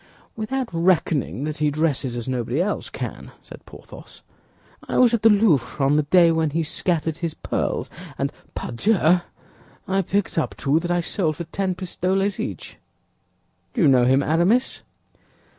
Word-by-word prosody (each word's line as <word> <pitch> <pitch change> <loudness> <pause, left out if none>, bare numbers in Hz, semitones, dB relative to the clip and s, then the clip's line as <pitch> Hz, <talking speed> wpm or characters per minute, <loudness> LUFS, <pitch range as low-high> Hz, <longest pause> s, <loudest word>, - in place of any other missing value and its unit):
"Without 250 +4 -2
reckoning 165 -5 +1
that 155 0 -3
he 150 0 +1
dresses 145 -4 -1
as 120 0 -5
nobody 125 +1 -2
else 200 +4 -1
can," - - -6
said - - -13
Porthos. - - -13 0.7
"I - - 0
was 245 -2 +5
at 230 - +1
the 225 - +6
Louvre 200 - +3
on 140 +2 +3
the 150 - +4
day 170 +3 +4
when 160 -1 +1
he 165 +3 -1
scattered 160 0 -1
his 170 -2 -4
pearls; - - -2 0.3
and, - - -2 0.2
pardieu, 180 - +2 0.7
I 195 0 +1
picked 195 -1 -1
up - - -2
two 145 +3 +2
that 175 +1 -5
I 175 0 +1
sold 165 -3 -1
for 170 - -5
ten 185 +2 -2
pistoles 190 +2 -1
each. - - -6 1.0
Do 230 - +2
you - - +6
know 130 -3 +5
him, 135 +2 +3
Aramis?" 175 - +1
165 Hz, 160 wpm, -23 LUFS, 150-190 Hz, 1.0 s, the